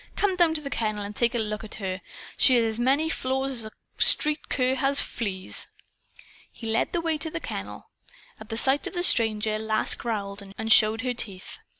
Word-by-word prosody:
"Come 400 Hz, -2 st, +1 dB
down 340 Hz, -3 st, +3 dB
to 305 Hz, -, +1 dB
the 280 Hz, -2 st, -6 dB
kennel 215 Hz, -2 st, -2 dB
and 205 Hz, +1 st, -7 dB
take 235 Hz, +2 st, +1 dB
a -, -, +2 dB
look 215 Hz, -1 st, -3 dB
at 220 Hz, -, -7 dB
her. 190 Hz, -2 st, -4 dB, 0.3 s
She 260 Hz, -, +5 dB
has 235 Hz, -1 st, +3 dB
as 225 Hz, 0 st, -2 dB
many 275 Hz, +6 st, +2 dB
flaws 265 Hz, -3 st, -1 dB
as 235 Hz, -4 st, 0 dB
a 215 Hz, -, -8 dB, 0.3 s
street 300 Hz, 0 st, +3 dB
cur 255 Hz, -1 st, +1 dB
has 275 Hz, +1 st, +2 dB
fleas." 195 Hz, -5 st, -1 dB, 0.8 s
He 230 Hz, -, -11 dB
led 225 Hz, -, +1 dB
the 345 Hz, -, -1 dB
way 325 Hz, -2 st, -1 dB
to 320 Hz, -, -2 dB
the 330 Hz, -, -4 dB
kennel. -, -, -7 dB, 0.5 s
At 220 Hz, -, -12 dB
sight 265 Hz, +4 st, +2 dB
of -, -, -7 dB
the 350 Hz, -, 0 dB
stranger 215 Hz, -6 st, +2 dB
Lass 220 Hz, 0 st, +2 dB
growled 205 Hz, -3 st, -4 dB, 0.2 s
and 220 Hz, 0 st, +4 dB
showed 220 Hz, +1 st, +5 dB
her 250 Hz, -1 st, -1 dB
teeth. 195 Hz, -6 st, -7 dB
235 Hz, 205 wpm, -26 LUFS, 215-275 Hz, 0.8 s, She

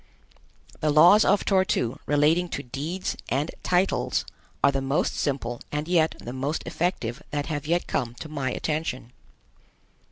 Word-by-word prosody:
The 155 Hz, -, +1 dB
laws 170 Hz, +8 st, +7 dB
of 205 Hz, -, +3 dB
Tor 190 Hz, -2 st, +4 dB
tu 130 Hz, -, -1 dB
relating 155 Hz, +4 st, +3 dB
to 140 Hz, -, -6 dB
deeds 155 Hz, +9 st, -4 dB
and 140 Hz, +6 st, 0 dB
titles 185 Hz, +1 st, +1 dB, 0.4 s
are 140 Hz, -, +6 dB
the 135 Hz, 0 st, -1 dB
most 135 Hz, +2 st, 0 dB
simple 120 Hz, -4 st, -2 dB
and 150 Hz, +1 st, -2 dB
yet 165 Hz, -3 st, +2 dB
the 120 Hz, -, -7 dB
most 140 Hz, +4 st, -2 dB
effective 165 Hz, -8 st, -2 dB
that 145 Hz, -1 st, -2 dB
have 150 Hz, -2 st, -4 dB
yet 170 Hz, +2 st, +1 dB
come 120 Hz, -3 st, -2 dB
to 155 Hz, -, -8 dB
my 140 Hz, -4 st, -2 dB
attention. 150 Hz, -4 st, -3 dB
150 Hz, 155 wpm, -26 LUFS, 135-170 Hz, 0.4 s, laws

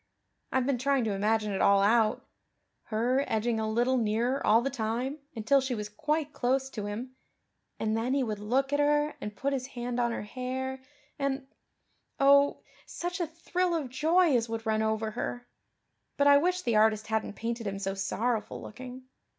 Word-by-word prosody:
I've 260 Hz, -1 st, +1 dB
been 270 Hz, -2 st, 0 dB
trying 275 Hz, 0 st, +2 dB
to 215 Hz, -2 st, 0 dB
imagine 210 Hz, +1 st, +1 dB
it 195 Hz, -, -1 dB
all 200 Hz, 0 st, +5 dB
out 225 Hz, +3 st, +3 dB, 0.6 s
her 245 Hz, +5 st, +1 dB
edging 225 Hz, +1 st, 0 dB
a 220 Hz, 0 st, -1 dB
little 240 Hz, +4 st, +2 dB
nearer 235 Hz, +4 st, 0 dB
all 225 Hz, +3 st, +4 dB
the 275 Hz, -, -1 dB
time 240 Hz, +6 st, -2 dB, 0.2 s
until 270 Hz, +5 st, +3 dB
she 260 Hz, -1 st, -2 dB
was 210 Hz, -1 st, -5 dB
quite 300 Hz, +6 st, -2 dB
close 265 Hz, +2 st, 0 dB
to 210 Hz, -4 st, -4 dB
Him; 240 Hz, +5 st, -6 dB, 0.6 s
and 220 Hz, 0 st, 0 dB
then 240 Hz, +4 st, 0 dB
He 275 Hz, -, +2 dB
would 215 Hz, -4 st, -3 dB
look 265 Hz, +7 st, 0 dB
at 285 Hz, -, +2 dB
her 295 Hz, +1 st, +2 dB
and 210 Hz, 0 st, -5 dB
put 280 Hz, +6 st, -1 dB
His 260 Hz, -1 st, -2 dB
hand 245 Hz, -2 st, -4 dB
on 240 Hz, -1 st, +1 dB
her -, -, -4 dB
hair 260 Hz, +3 st, -4 dB, 0.4 s
and 275 Hz, -1 st, -1 dB, 0.7 s
oh, 280 Hz, +1 st, +5 dB, 0.2 s
such 350 Hz, +1 st, -4 dB
a 345 Hz, -, 0 dB
thrill 345 Hz, +2 st, -1 dB
of 295 Hz, -6 st, -2 dB
joy 320 Hz, +4 st, +3 dB
as 230 Hz, -1 st, +1 dB
would 225 Hz, 0 st, -4 dB
run 220 Hz, 0 st, +1 dB
over 220 Hz, 0 st, 0 dB
her! 245 Hz, +1 st, -4 dB, 0.7 s
But 285 Hz, -, +3 dB
I 285 Hz, 0 st, +8 dB
wish 360 Hz, +3 st, 0 dB
the 235 Hz, -3 st, +2 dB
artist 215 Hz, 0 st, +3 dB
hadn't 220 Hz, -1 st, -2 dB
painted 230 Hz, 0 st, -4 dB
Him 195 Hz, 0 st, -3 dB
so 195 Hz, 0 st, -2 dB
sorrowful 210 Hz, +3 st, -2 dB
looking. 255 Hz, +3 st, -9 dB
245 Hz, 185 wpm, -29 LUFS, 220-275 Hz, 0.7 s, I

